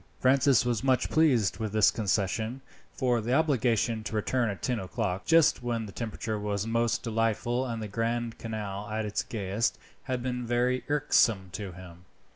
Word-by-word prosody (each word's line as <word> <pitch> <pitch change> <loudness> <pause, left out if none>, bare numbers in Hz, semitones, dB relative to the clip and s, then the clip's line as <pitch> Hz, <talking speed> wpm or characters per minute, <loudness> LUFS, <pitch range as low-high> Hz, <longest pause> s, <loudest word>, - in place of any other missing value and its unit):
Francis 130 -1 +4
was 120 -1 0
much 130 -2 +2
pleased 130 - +3
with 110 -2 -3
this 110 -2 +5
concession, 110 +3 -1 0.3
for 125 -4 0
the 120 +4 0
obligation 120 -7 +1
to 110 - -5
return 120 +2 0
at 100 - -6
ten 125 -3 0
o'clock, 95 0 -3
just 165 -5 +4
when 120 -2 -2
the 100 - -9
temperature 110 0 -4
was 105 -1 -2
most 115 0 0
delightful 115 +2 0
and 115 -2 -4
the - - -4
Grand 115 +2 -2
Canal 105 -2 -5
at 110 0 -2
its 105 - -1
gayest, 105 +2 -2 0.3
had 130 -2 -2
been 125 -1 -2
very 125 +2 +1
irksome 115 -9 +2
to 100 -2 -6
him. 90 0 -12
115 Hz, 170 wpm, -28 LUFS, 105-125 Hz, 0.3 s, this